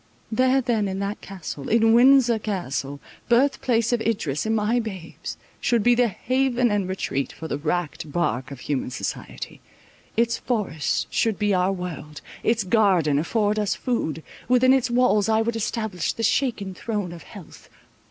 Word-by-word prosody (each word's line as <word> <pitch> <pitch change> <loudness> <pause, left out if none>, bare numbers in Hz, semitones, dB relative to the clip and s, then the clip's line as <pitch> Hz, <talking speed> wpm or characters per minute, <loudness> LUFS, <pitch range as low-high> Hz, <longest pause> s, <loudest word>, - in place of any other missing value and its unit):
There 255 +4 +3
then 230 -5 0
in 190 0 -3
that 200 +2 -3
castle—in 195 +4 0
Windsor 245 -1 +6
Castle, 145 -9 -3 0.3
birth 265 +3 +3
place 235 -1 +1
of 240 - +1
Idris 200 -8 -1
and 220 - +1
my 220 +3 +1
babes, 190 -7 -6 0.2
should 235 -3 +1
be 245 - +5
the 245 0 +3
haven 250 +2 +1
and 200 -3 0
retreat 140 -7 -2
for 160 - -8
the 145 - -3
wrecked 155 -1 -2
bark 135 -5 -1
of 140 -3 -9
human 140 -4 -2
society. - - -6 0.6
Its 235 0 +2
forest 205 - -1
should 225 -4 +1
be 205 -1 +1
our 185 +1 +2
world—its 180 +5 -3
garden 185 -8 +3
afford 210 +5 0
us 210 -2 0
food; 160 - -2 0.2
within 255 +1 +5
its 265 -2 +2
walls 240 -4 +3
I 220 0 +3
would 235 0 -2
establish 220 -5 -2
the 225 - -5
shaken 225 -4 0
throne 205 -2 -3
of 170 -1 -9
health. 195 -6 -13
210 Hz, 160 wpm, -24 LUFS, 175-235 Hz, 0.6 s, Windsor